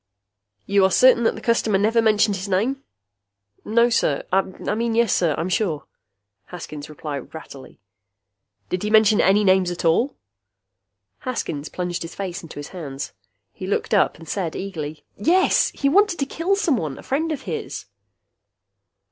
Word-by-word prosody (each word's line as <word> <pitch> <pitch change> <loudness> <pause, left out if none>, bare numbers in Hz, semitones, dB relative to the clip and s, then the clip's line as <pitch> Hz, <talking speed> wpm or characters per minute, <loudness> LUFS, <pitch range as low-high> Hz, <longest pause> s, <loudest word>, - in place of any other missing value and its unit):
"You 200 0 +3
are 190 - +5
certain 245 +2 +5
that - - +2
the - - -9
customer 230 -3 +2
never 220 +4 +3
mentioned 215 -2 +3
his 195 +2 -6
name?" 245 +9 0 0.8
"No, 235 +2 +3
sir. 145 -10 +1
I 190 +1 +4
mean 225 +4 -3
yes, 235 -4 +2
I'm 165 0 0
sure," 180 -5 -1 0.6
Haskins 155 -4 -8
replied 150 -2 -6
rattledly. 140 -4 -11 0.9
"Did 180 - -2
he 210 - -2
mention 215 -1 +5
any 200 +3 +4
names 190 -2 +4
at 175 -1 -5
all?" 235 - +2 1.0
Haskins 155 - -4
plunged 180 -1 -4
his 165 - -7
face 190 -3 -4
into 165 - -11
his 145 - -7
hands. 140 -7 -6 0.4
He 185 - -7
looked 200 - -1
up 205 - +3
and 165 - -13
said 170 -2 -3
eagerly, 155 -6 -6
"Yes! 350 - +3
He 280 - 0
wanted 395 +4 +3
to 275 - -1
kill 335 +8 0
someone! 240 - 0
A - - -11
friend 315 +5 -1
of 285 -4 -4
his!" 145 - -5
195 Hz, 155 wpm, -22 LUFS, 165-235 Hz, 1.0 s, are